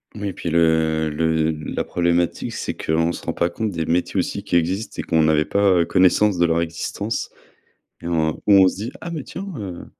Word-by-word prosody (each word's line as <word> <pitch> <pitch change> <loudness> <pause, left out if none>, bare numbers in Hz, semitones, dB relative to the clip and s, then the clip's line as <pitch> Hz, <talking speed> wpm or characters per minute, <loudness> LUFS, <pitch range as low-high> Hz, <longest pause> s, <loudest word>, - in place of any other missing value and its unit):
Oui 100 -2 -3
puis 85 - -5
le 80 -1 +2
le 80 +1 +1
la 75 -1 -4
problématique 85 0 0
c'est - - -4
qu'on 80 +2 0
se - - -9
rend - - -2
pas 85 - 0
compte 110 +3 -3
des 80 -1 -3
métiers, 90 +3 0
aussi, 100 +2 -3
qui 100 -3 -2
existent 90 +6 -1
et - - +1
qu'on 80 -1 +2
n'avait 80 -1 +3
pas, 100 -1 +2
heu, - - +1
connaissance 95 +1 +3
de 85 - +3
leur 85 0 +1
existence. 85 +6 -4 0.7
Et - - -7
en 80 -2 +1
où 105 - +5
on 95 -1 +7
se - - -5
dit: 110 +6 -5
«Ah 170 - -6
mais 155 -4 -4
tiens, 195 +2 -7
heu, 95 -4 -7
85 Hz, 215 wpm, -21 LUFS, 80-100 Hz, 0.7 s, on